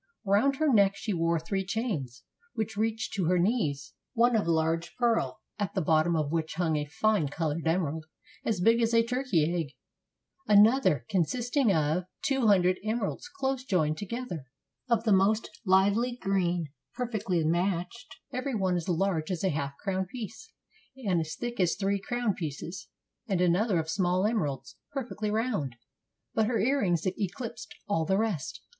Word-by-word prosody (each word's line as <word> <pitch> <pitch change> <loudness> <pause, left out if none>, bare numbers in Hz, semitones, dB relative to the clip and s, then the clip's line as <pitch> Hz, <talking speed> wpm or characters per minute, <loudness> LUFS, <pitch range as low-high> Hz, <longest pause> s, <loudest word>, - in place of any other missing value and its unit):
Round 210 +8 +3
her 300 -1 +2
neck 200 -3 +5
she 210 +1 -3
wore 165 -1 +1
three 195 +4 -2
chains, 185 - -3 0.3
which 220 -1 -2
reached 220 +1 -1
to 190 -3 0
her 180 +2 +3
knees: 170 - 0 0.2
one 240 +1 +4
of 210 -5 +1
large 165 0 0
pearl, 225 - +1 0.2
at 205 -3 -2
the 190 - +1
bottom 160 +2 +3
of 150 -2 0
which 160 -2 -2
hung 165 -2 +1
a 150 -1 -1
fine 180 +1 +1
colored 160 +2 -2
emer 165 -3 +1
ald, 160 0 -6 0.4
as 210 -5 -1
big 230 +4 +4
as 230 0 +2
a 230 0 +5
turkey 230 - +1
egg; 160 -7 -3 0.7
another, 210 - +5
consisting 240 - +1
of 160 +1 +1 0.2
two 270 -4 +2
hundred 185 -2 +4
emeralds, 220 - -2
close 270 -8 -2
joined 155 - +1
together, 205 - -5 0.4
of 235 -1 +2
the 220 -3 +3
most 200 +3 +2 0.2
lively 200 +6 +3
green, 175 -4 0 0.3
perfectly 215 -8 -1
matched, 180 +6 -1 0.2
every 255 0 -2
one 190 -3 +1
as 175 0 -3
large 175 -2 0
as 180 -2 -2
a 190 - +3
half 140 -3 -3
crown 190 -2 -2
piece, 220 0 -8 0.5
and 180 -4 +2
as 155 -1 -5
thick 240 -2 -5
as 180 -3 +3
three 200 0 0
crown 240 -1 -1
pieces; 165 +2 -6 0.4
and 195 -5 0
another 180 +3 +3
of 160 -1 -1
small 180 +2 +1
emeralds, 185 - -2
perfectly 235 -6 -3
round. 210 - -1 0.6
But 220 -1 +2
her 235 0 +1
earrings 205 - +1
eclipsed 220 +5 -4
all 165 -6 +1
the 190 +4 +2
rest. 210 -10 -2
195 Hz, 165 wpm, -29 LUFS, 165-225 Hz, 0.7 s, neck